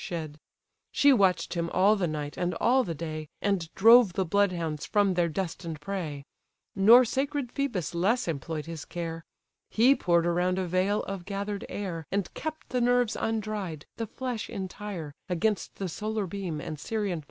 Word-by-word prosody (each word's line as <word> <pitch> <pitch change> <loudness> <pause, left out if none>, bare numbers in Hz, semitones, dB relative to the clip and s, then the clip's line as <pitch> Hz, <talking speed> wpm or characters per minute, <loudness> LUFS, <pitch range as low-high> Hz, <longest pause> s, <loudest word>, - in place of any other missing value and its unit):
shed: 155 -3 -5 0.5
She 285 -1 +5
watch'd 185 -7 +2
him 170 -1 -1
all 195 +5 +4
the 190 -4 0
night 150 -2 -4
and 180 -1 -1
all 255 +7 +3
the 170 -6 -4
day, 155 -1 -5
And 190 -5 -1
drove 225 -2 +7
the 190 - 0
bloodhounds 170 -5 0
from 205 -2 +2
their 175 -1 +1
destined 165 -2 -4
prey. 150 -5 -4 0.5
Nor 230 +6 +8
sacred 270 +1 -2
Phœbus 240 - -2
less 205 +8 +1
employ'd 155 0 -3
his 165 -2 -6
care; 165 -1 -5 0.5
He 245 +5 +5
pour'd 170 -8 +2
around 180 +2 +1
a 190 - 0
veil 185 +4 +1
of 195 -2 -5
gather'd 200 +1 -4
air, 170 -6 -5
And 200 0 -1
kept 315 0 -6
the 250 -1 0
nerves 245 -1 +2
undried, 210 -8 -3
the 225 - -3
flesh 245 -1 -4
entire, 190 -5 -6 0.2
Against 190 +4 0
the 195 - -3
solar 215 +4 -3
beam 180 -4 -4
and 150 0 -6
Sirian 205 0 -2
fire. - - -5
190 Hz, 170 wpm, -28 LUFS, 165-215 Hz, 0.5 s, Nor